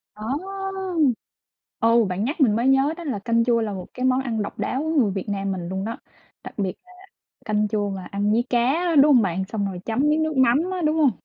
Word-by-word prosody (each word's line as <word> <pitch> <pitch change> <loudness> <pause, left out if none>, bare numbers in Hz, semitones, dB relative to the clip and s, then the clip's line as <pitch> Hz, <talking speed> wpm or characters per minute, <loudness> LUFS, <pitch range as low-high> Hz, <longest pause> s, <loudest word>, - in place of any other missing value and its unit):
Đó! 210 - -11 1.6
Ừ, 230 0 +4
bạn 185 +3 -2
nhắc 295 +5 -3
mình 220 -6 +4
mới 240 +3 +1
nhớ 270 +3 +3
đó 345 - -7
là 260 -9 -3
canh 230 +2 +1
chua 235 -1 +2
là 210 -2 -2
một 185 -2 -6
cái 255 0 -3
món 260 +1 +2
ăn 230 -4 -2
độc 205 - -6
đáo 265 - -1
của 315 - -2
người 255 -11 +2
Việt 190 -1 -4
Nam 195 -1 -2
mình 175 -2 -4
luôn 190 +1 -3
đó, 230 +1 -4 0.5
đặc - - -9
biệt 195 -3 -1
là 365 - -19 0.5
canh 210 0 +1
chua 205 -1 -1
mà 190 -1 -6
ăn 205 +1 0
với 235 +2 +2
cá, 260 +8 +1
đúng 290 +1 +6
hông 240 - +6
bạn? 190 0 -1
Xong 210 0 -3
rồi 180 -2 -6
chấm 225 +2 -2
miếng 315 +1 +2
nước 315 -3 -2
mắm 250 0 +5
á, 365 -1 -3
đúng 310 +1 +2
hông? 290 -5 +4
230 Hz, 245 wpm, -23 LUFS, 200-270 Hz, 1.6 s, đúng